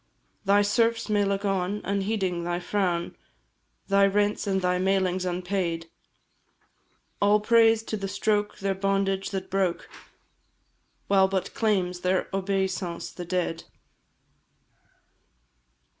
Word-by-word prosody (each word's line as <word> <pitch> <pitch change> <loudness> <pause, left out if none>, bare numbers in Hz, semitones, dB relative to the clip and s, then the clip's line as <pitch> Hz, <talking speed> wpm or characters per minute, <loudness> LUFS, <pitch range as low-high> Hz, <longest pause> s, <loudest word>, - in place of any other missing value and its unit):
Thy 200 +1 +4
serfs 230 +2 +1
may 205 -1 +2
look 200 0 -1
on, 195 +1 0
unheeding 195 -3 -1
thy 175 0 -2
frown, 175 -2 -1 0.7
Thy 200 0 +4
rents 205 +1 0
and 190 -1 +1
thy 180 -1 0
mailings 185 -1 +1
unpaid; 180 -2 -2 1.3
All 205 +1 +5
praise 225 +1 +4
to 220 - -4
the 195 -1 -4
stroke 210 +1 0
their 195 -1 -1
bondage 195 0 0
that 190 -1 -5
broke! 190 -3 0 1.2
While 195 -1 +4
but 190 -1 -2
claims 185 -5 0
their 185 +1 0
obeisance 190 -2 -2
the 175 - -7
dead. 175 -2 -2
195 Hz, 115 wpm, -26 LUFS, 180-205 Hz, 1.3 s, All